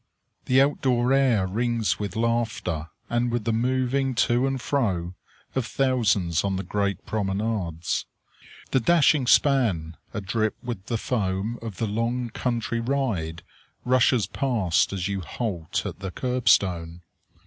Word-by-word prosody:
The 130 Hz, +1 st, +4 dB
out 145 Hz, +1 st, -1 dB
door 125 Hz, 0 st, +2 dB
air 130 Hz, -8 st, +3 dB
rings 115 Hz, +3 st, 0 dB
with 100 Hz, -3 st, -4 dB
laughter, 110 Hz, -8 st, -1 dB, 0.2 s
and 120 Hz, +1 st, 0 dB
with 120 Hz, -2 st, -1 dB
the 115 Hz, +1 st, 0 dB
moving 130 Hz, +2 st, 0 dB
to 120 Hz, +3 st, +2 dB
and 135 Hz, -1 st, -1 dB
fro 95 Hz, -11 st, -1 dB, 0.4 s
of 130 Hz, -3 st, -1 dB
thousands 105 Hz, -, +1 dB
on 100 Hz, -1 st, 0 dB
the 95 Hz, -, -3 dB
great 100 Hz, +1 st, -2 dB
promenades. 95 Hz, -5 st, -2 dB, 0.6 s
The 130 Hz, -, +4 dB
dashing 150 Hz, -1 st, +4 dB
span, 110 Hz, -, +3 dB, 0.2 s
adrip 110 Hz, +1 st, -1 dB
with 115 Hz, -5 st, -5 dB
the 115 Hz, -, 0 dB
foam 105 Hz, 0 st, -2 dB
of 110 Hz, -5 st, -6 dB
the 115 Hz, -, -1 dB
long 115 Hz, +3 st, -1 dB
country 115 Hz, -1 st, -2 dB
ride, 115 Hz, -11 st, -2 dB, 0.4 s
rushes 125 Hz, -3 st, +3 dB
past 110 Hz, -, +1 dB
as 95 Hz, -2 st, -2 dB
you 100 Hz, -1 st, -2 dB
halt 85 Hz, -2 st, -3 dB
at -, -, -5 dB
the 95 Hz, -1 st, -4 dB
curb 125 Hz, +3 st, -1 dB
stone. 85 Hz, -4 st, +2 dB
115 Hz, 140 wpm, -25 LUFS, 95-125 Hz, 0.6 s, The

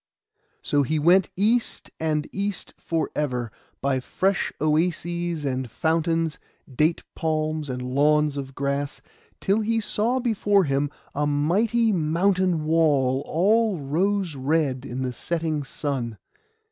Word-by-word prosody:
So 145 Hz, -, +2 dB
he 155 Hz, +3 st, 0 dB
went 175 Hz, +5 st, +4 dB
east, 225 Hz, +4 st, +1 dB
and 155 Hz, -2 st, 0 dB
east 200 Hz, 0 st, -3 dB
for 165 Hz, -1 st, -2 dB
ever, 125 Hz, -6 st, -1 dB, 0.3 s
by 135 Hz, -1 st, +1 dB
fresh 195 Hz, +9 st, 0 dB
oases 170 Hz, +1 st, 0 dB
and 130 Hz, -2 st, -2 dB
fountains, 165 Hz, +4 st, 0 dB, 0.4 s
date 155 Hz, +5 st, +2 dB
palms, 155 Hz, -2 st, -1 dB
and 125 Hz, 0 st, -3 dB
lawns 150 Hz, +3 st, +2 dB
of 135 Hz, -1 st, -6 dB
grass, 140 Hz, 0 st, -2 dB, 0.4 s
till 200 Hz, +3 st, +2 dB
he 225 Hz, +1 st, +1 dB
saw 225 Hz, +4 st, 0 dB
before 205 Hz, -5 st, +2 dB
him 140 Hz, -1 st, 0 dB, 0.2 s
a 145 Hz, +1 st, 0 dB
mighty 205 Hz, +11 st, +2 dB
mountain 175 Hz, 0 st, +1 dB
wall, 145 Hz, -5 st, +3 dB
all 205 Hz, +3 st, +2 dB
rose 175 Hz, +4 st, 0 dB
red 135 Hz, -1 st, 0 dB
in 130 Hz, +2 st, -4 dB
the 125 Hz, -1 st, -2 dB
setting 160 Hz, 0 st, -2 dB
sun. 135 Hz, -6 st, -3 dB
155 Hz, 125 wpm, -24 LUFS, 140-185 Hz, 0.4 s, went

